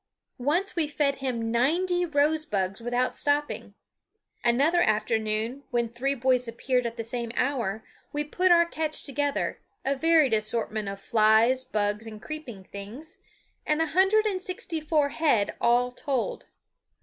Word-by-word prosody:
Once 330 +10 0
we 325 -3 +1
fed 285 -2 0
him 240 -4 -2
ninety 350 +9 +1
rose 305 +1 +2
bugs 195 -4 -2
without 245 +2 0
stopping. 290 0 -1 0.7
Another 280 +9 +3
afternoon, 220 +3 0
when 240 -2 0
three 255 +5 -2
boys 250 -1 +1
appeared 250 +1 0
at 235 +1 -7
the 230 - -3
same 235 0 -4
hour, 230 -6 -1 0.3
we 295 0 -1
put 360 +5 +1
our 340 -1 +6
catch 315 -2 -2
together, 285 0 -1 0.3
a 275 +1 +1
varied 315 -3 +4
assortment 215 -1 -1
of 195 0 -6
flies, 220 +5 +4
bugs, 210 -2 -1
and 215 -1 -8
creeping 250 -8 -8
things, 225 - -9 0.5
a 310 +1 +2
hundred 385 +6 +3
and 385 -3 -1
sixty 360 -3 -4
four 300 -2 +1
head 280 -10 +1
all 245 +1 +3
told. 260 0 -3
260 Hz, 145 wpm, -27 LUFS, 230-310 Hz, 0.7 s, our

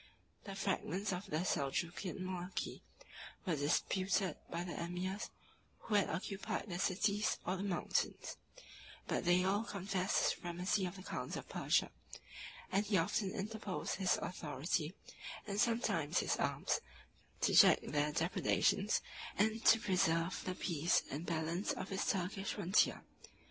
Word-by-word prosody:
The 195 -2 -6
fragments 195 0 -1
of 185 +3 -4
the 170 -1 -1
Seljukian 175 +5 -1
monarchy 185 0 -4 0.6
were 175 -4 +1
disputed 185 +6 +1
by 170 +1 -2
the 175 - -5
emirs 180 +5 -3 0.5
who 220 - -5
had 205 -2 +4
occupied 195 +6 -3
the 175 -1 -3
cities 205 +2 +1
or 185 - 0
the 190 - -4
mountains; 195 -3 -1 0.7
but - - -1
they 175 +1 +5
all 200 +3 +2
confessed 195 -3 -1
the - - +4
supremacy 180 +3 -1
of 180 - -7
the 185 - -9
khans - - -4
of - - -7
Persia; - - +2 0.8
and 200 +2 +2
he 200 -2 +3
often 190 +3 +1
interposed 210 -1 -3
his 190 -2 +2
authority, 155 +1 -2 0.5
and 205 0 0
sometimes 225 - +1
his - - +2
arms, - - 0 0.6
to - - +3
check - - +8
their 150 +1 0
depredations, 165 +4 +2 0.4
and 220 +2 +2
to 225 - +8
preserve 175 -4 +1
the 185 - -2
peace 170 -2 +1
and 150 +5 -4
balance 165 +4 -1
of - - -5
his 195 0 -1
Turkish 195 +1 -1
frontier. 185 +5 +2
185 Hz, 140 wpm, -36 LUFS, 170-200 Hz, 0.8 s, check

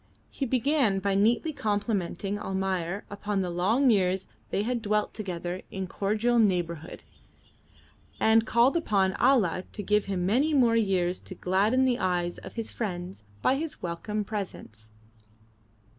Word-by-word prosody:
He 275 - -3
began 255 -3 +2
by 195 +1 0
neatly 235 +10 +2
complimenting 205 -3 -2
Almayer 190 -1 -2
upon 205 -1 -2
the 180 -2 -2
long 220 +10 +3
years 190 -2 +1 0.2
they 200 - 0
had 240 +1 -1
dwelt 210 -1 0
together 180 -3 -4
in 190 -1 -4
cordial 215 +6 0
neighbourhood, 175 -6 0 1.2
and 220 0 +5
called 235 +6 +4
upon 200 - +2
Allah 220 -9 +3
to 205 - -5
give 210 +1 +2
him 185 -3 -2
many 275 +10 +2
more 240 -4 +4
years 185 -5 +1
to 185 - -9
gladden 205 +9 +2
the 250 -2 +1
eyes 175 -2 -1
of - - -11
his 230 -2 -4
friends 180 - -5 0.2
by - - +4
his 310 +1 -5
welcome 185 +5 -3
presence. 185 - -7
205 Hz, 145 wpm, -27 LUFS, 185-230 Hz, 1.2 s, and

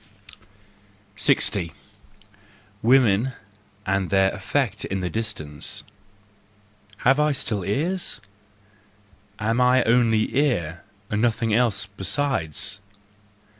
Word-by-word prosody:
60. 85 -5 +2 1.1
Women 120 0 +4 0.5
and 95 -1 0
their 95 0 +3
Effect 105 +2 -2
in 95 0 -3
the 90 - -3
Distance 105 -10 -4 1.2
.—Have 135 +3 +4
I 150 0 +3
still 105 -7 -2
ears? 165 - 0 1.2
Am 115 +3 0
I 125 0 +4
only 115 -1 +2
ear, 105 - 0 0.3
and 105 0 0
nothing 115 -2 +1
else 110 -4 +2
besides? 100 - -1
110 Hz, 90 wpm, -24 LUFS, 95-125 Hz, 1.2 s, Women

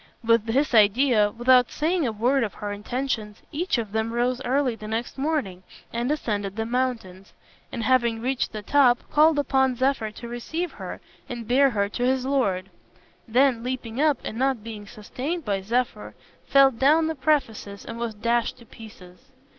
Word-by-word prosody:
With 230 -1 +3
this 265 +5 +1
idea, 215 0 +4
without 250 +2 +4
saying 325 -1 0
a - - -1
word 240 +5 +1
of 210 - -4
her 205 0 -5
intentions, 215 0 -4
each 335 0 -1
of 220 -4 -4
them 220 +1 -2
rose 245 +2 0
early 260 -1 +1
the 215 -1 -9
next 225 +2 -3
morning 270 - -2 0.3
and 235 +2 -1
ascended 205 -9 -2
the 225 0 -2
mountains, 230 -6 -3 0.4
and 230 - -4
having 235 -3 +2
reached 255 +2 -1
the 215 -1 -7
top, 250 -1 +3
called 305 +1 +5
upon 265 -2 +2
Zephyr 260 -3 0
to 225 +3 -10
receive 315 +9 -4
her - - -8 0.3
and 235 -3 -6
bear 275 +3 +4
her 200 -4 0
to 245 - -3
his 260 0 +1
lord; 195 -9 0 0.6
then 250 +1 +3
leaping 250 0 -4
up, 300 -3 +3
and 220 - -5
not 265 -4 0
being 215 -2 -8
sustained 270 - -5
by 200 -2 -1
Zephyr, 240 +6 -2 0.3
fell 275 -1 +6
down 290 +7 +3
the 320 - -1
precipice 255 -9 -1
and 230 0 -7
was 235 -2 -3
dashed 235 +2 0
to 235 - -16
pieces. 215 -2 -14
240 Hz, 175 wpm, -24 LUFS, 220-270 Hz, 0.6 s, fell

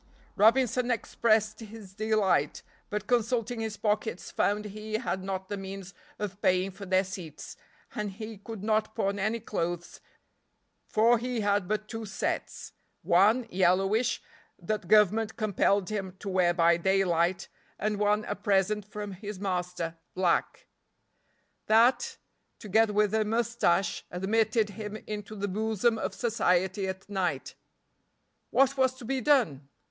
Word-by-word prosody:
Robinson 245 +3 +3
expressed 220 -2 +1
his 215 -3 -11
delight, 210 -8 +1 0.3
but 210 0 -3
consulting 235 0 0
his 220 -2 -3
pockets 210 -3 -1
found 210 +1 0
he 215 +1 -7
had 215 -5 -2
not 190 0 -4
the 205 - -4
means 195 -1 -7 0.2
of 205 -1 -5
paying 185 +1 +2
for 195 +1 -10
their 185 +1 +3
seats, 180 -6 -8 0.4
and 210 -1 -3
he 215 0 -8
could 210 -1 -8
not 215 0 0
pawn 200 -2 -1
any 215 +4 0
clothes, 175 -5 -4 0.9
for 230 +2 +4
he 245 -1 -2
had 205 -2 +1
but 215 +1 -2
two 225 -1 -6
sets. 195 - -4 0.3
One 210 +8 +4
(yellowish) 195 +6 +2 0.3
that 215 -4 -3
government 215 +2 +4
compelled 200 -2 +1
him 195 -3 -4
to 200 - -6
wear 185 -2 +3
by 170 -1 +4
daylight, 180 -1 +1 0.3
and 210 -1 -1
one 210 +1 +2
a - - -2
present 205 +1 +1
from 210 0 -6
his 200 +1 -7
master 180 -3 -3 0.2
(black). 180 -2 0 1.0
That, 250 - +4 0.4
together 220 +1 +2
with 210 0 +2
a 220 0 +3
mustache, 215 -5 +1
admitted 215 +3 +1
him 210 0 -6
into 210 0 -6
the 205 0 -2
bosom 220 +3 0
of - - -3
society 190 -4 +1
at 190 0 -6
night. 180 -9 -2 1.0
What 270 0 +3
was 260 -1 +2
to 255 -2 -11
be 265 +2 -1
done? 160 - +2
210 Hz, 140 wpm, -29 LUFS, 190-220 Hz, 1.0 s, for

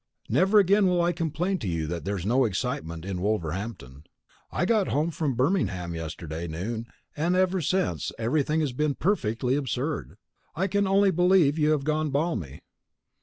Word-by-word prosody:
Never 195 +3 +4
again 200 0 +5
will 180 -1 +2
I 175 - +2
complain 175 +3 -1
to 105 - -4
you 85 -3 -1
that 85 +2 -4
there 100 +1 -1
is 90 - -5
no 125 +5 +3
excitement 90 -7 -3
in 95 -2 -4
Wolverhampton. 90 - -3 0.5
I - - 0
got 210 -1 +2
home 155 +4 0
from 150 -5 -1
Birmingham 115 - 0
yesterday 80 0 -5
noon 110 +8 -4 0.3
and 170 +4 +1 0.3
since - - +1
then 185 - +1 0.2
everything 150 +6 +1
has 145 -5 -1
been 150 +2 0
perfectly 125 - 0
absurd. 130 - -3 0.4
I 180 +4 0
can 200 +1 +1
only 195 0 +4
believe 175 -4 +3
you 150 0 +3
have 150 -3 +2
gone 155 +1 0
balmy. 140 - -2
135 Hz, 170 wpm, -26 LUFS, -, 0.5 s, again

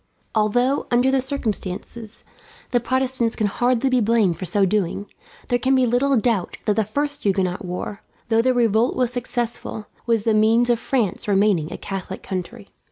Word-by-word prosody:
Although, 245 +6 +1
under 245 +2 +3
the 265 -1 +2
circumstances, 225 -4 -4 0.5
the 245 - +3
Protestants 255 -1 0
can 215 - 0
hardly 245 +5 +1
be 255 -1 +3
blamed 210 -6 +2
for 185 - -4
so 195 +3 +2
doing, 200 0 -1 0.4
there 245 - +2
can 265 +2 +2
be 260 -1 +4
little 255 +3 +2
doubt 215 -5 0
that 210 - +2
the 220 - +2
first 290 +6 -1
Huguenot 190 -2 0
war, 180 +3 -5 0.3
though 225 0 +4
the 255 +1 +2
revolt 230 0 +2
was 250 -1 0
successful, 240 -3 -4 0.2
was 230 -3 +2
the 225 - +2
means 225 +3 +4
of 235 - +1
France 230 -8 -1
remaining 195 -5 +2
a - - -5
Catholic 190 -1 -6
country. 195 +3 -6
230 Hz, 170 wpm, -22 LUFS, 205-245 Hz, 0.5 s, be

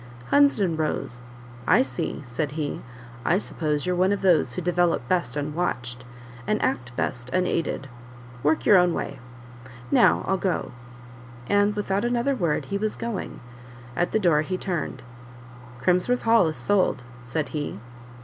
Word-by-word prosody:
Hunsden 220 - +4
rose: 120 -6 -3 0.4
"I - - +6
see," 130 +2 -4
said 140 +4 -3
he; 150 -2 -3 0.4
"I 175 - +3
suppose 155 -6 -2
you're 180 0 0
one 185 +2 +3
of 200 -1 -1
those 165 -9 +4
who - - -2
develop 175 -7 +1
best 160 -7 0
unwatched, 140 -5 -3 0.4
and 215 - +1
act 125 - -1
best 120 0 -2
unaided 165 -3 -1 0.5
work 150 +3 +1
your 200 - +7
own 180 -1 +3
way. - - -4 0.7
Now, - - +4
I'll 190 - +2
go." 185 0 -1 0.8
And, 205 +1 +3
without 200 -1 -1
another 240 +3 +1
word, 170 - 0
he 200 0 -2
was 215 +1 -1
going; 230 -4 -5 0.5
at 175 - 0
the - - +2
door 170 -7 +3
he 185 +4 -2
turned: 180 -4 -3 0.8
"Crimsworth 180 - +2
Hall 225 -6 +5
is 155 - -3
sold," 190 -10 +1 0.2
said 125 +6 -3
he. 145 -8 -4
175 Hz, 150 wpm, -25 LUFS, 145-200 Hz, 0.8 s, your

